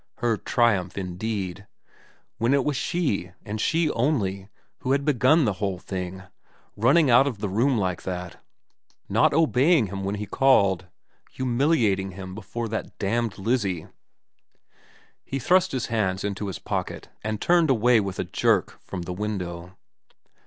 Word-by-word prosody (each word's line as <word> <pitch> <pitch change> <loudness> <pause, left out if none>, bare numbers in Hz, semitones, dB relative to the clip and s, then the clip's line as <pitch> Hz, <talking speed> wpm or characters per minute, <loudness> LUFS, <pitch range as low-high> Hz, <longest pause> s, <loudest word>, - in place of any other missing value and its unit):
Her 120 -2 +1
triumph, 105 -6 +1
indeed 95 +1 -4 0.7
when 120 +5 +3
it 140 - +1
was 150 - 0
she, 115 - -1
and 105 0 -4
she 165 -1 +2
only, 100 -7 -1 0.3
who 130 - 0
had 140 0 0
begun 150 +2 +4
the 105 - +1
whole 100 -3 -1
thing, 95 0 -6 0.5
running 135 +6 +4
out 130 +4 +6
of 125 -6 -3
the 105 +1 -3
room 120 +7 +2
like 95 -4 -1
that, 90 -2 -6 0.6
not 145 +10 +3
obeying 155 -2 +3
him 95 0 -5
when 100 +1 -2
he 105 0 -4
called, 100 -8 +3 0.4
humiliating 120 - +1
him 95 0 -8
before 110 +4 -5
that 110 - -5
damned 115 +1 -1
Lizzie.... 95 -6 -1 1.3
He 135 - -4
thrust 185 +6 +3
his 130 -2 -2
hands 100 -5 -1
into 100 0 -3
his 95 -5 -4
pockets - - -4 0.2
and 110 0 -2
turned 170 -3 +3
away 120 -1 +4
with 95 -2 -3
a - - -1
jerk - - 0
from 90 -3 -6
the 90 - -5
window. 90 -3 -5
105 Hz, 150 wpm, -25 LUFS, 95-130 Hz, 1.3 s, out